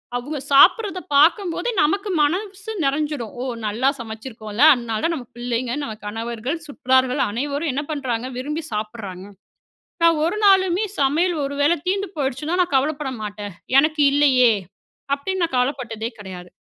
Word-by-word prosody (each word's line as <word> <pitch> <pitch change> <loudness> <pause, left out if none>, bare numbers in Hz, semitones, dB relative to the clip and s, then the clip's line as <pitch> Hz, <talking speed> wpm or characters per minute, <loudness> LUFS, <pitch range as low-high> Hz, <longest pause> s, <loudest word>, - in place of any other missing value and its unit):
அவுங்க 285 +5 -4
சாப்பிடுறத 390 - +5 0.2
பாக்கம்போதே 340 +9 +3
நமக்கு 395 +7 0
மனஸ்சு 385 +7 -1
நெறஞ்சிடும், 280 -4 -1
"ஓ - - -3 0.2
நல்லா 225 +6 +1
சமைச்சிருக்கோம்ல, 220 -1 -6
அதனாலதான் 235 +5 -2
நம்ம 250 -6 -8
பிள்ளைங்க, 240 0 -2
நம்ம 220 -6 -5
கணவர்கள், 230 +7 -4
சுற்றார்கள் 260 -3 +1
அனைவரும் 285 +7 -2
என்ன 285 +3 -2
பண்றாங்க? 255 -5 -2
விரும்பி 300 +5 -4
சாப்பிடுறாங்க," 210 -3 -5 0.8
நான் 330 -2 +5
ஒரு 350 +6 -1
நாளுமே 380 0 +4
சமையல் 320 +6 +2
ஒரு 280 +1 -4
வேள 295 +4 +4
தீந்து 390 +2 -1
போய்டுச்சுனா, 290 +5 -2
நான் 350 -5 -1
கவலைப்பட 285 0 0
மாட்டேன். 205 -1 -6 0.3
"எனக்கு 310 +1 +1
இல்லையே?" 260 -4 +5 0.6
அப்டினு 375 +7 -3
நான் 330 - -5
கவலைப்பட்டதே 245 -3 -2
கிடையாது. 180 -3 -9
275 Hz, 135 wpm, -21 LUFS, 235-320 Hz, 0.8 s, சாப்பிடுறத